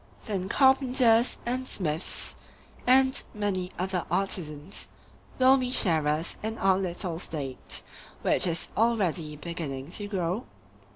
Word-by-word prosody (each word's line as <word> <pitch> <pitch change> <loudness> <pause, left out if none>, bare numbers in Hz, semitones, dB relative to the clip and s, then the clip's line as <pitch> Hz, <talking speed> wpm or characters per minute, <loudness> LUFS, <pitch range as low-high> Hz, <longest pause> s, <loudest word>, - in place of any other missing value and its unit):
Then 195 -4 -3
carpenters, 255 -3 +4
and 255 +2 -2
smiths, 160 -6 0 0.5
and 260 +1 +5
many 190 -3 -2
other 185 0 -2
artisans, 150 - -2 0.5
will 260 +1 +6
be 255 -1 -1
sharers 160 - +1
in 220 +1 -3
our 190 -1 +3
little 175 -2 -3
State, 140 -7 -3 0.4
which - - +3
is 165 -1 -1
already 185 -9 +1
beginning 150 -3 -6
to 205 +2 -2
grow? 190 +3 -2
190 Hz, 115 wpm, -28 LUFS, 165-230 Hz, 0.5 s, will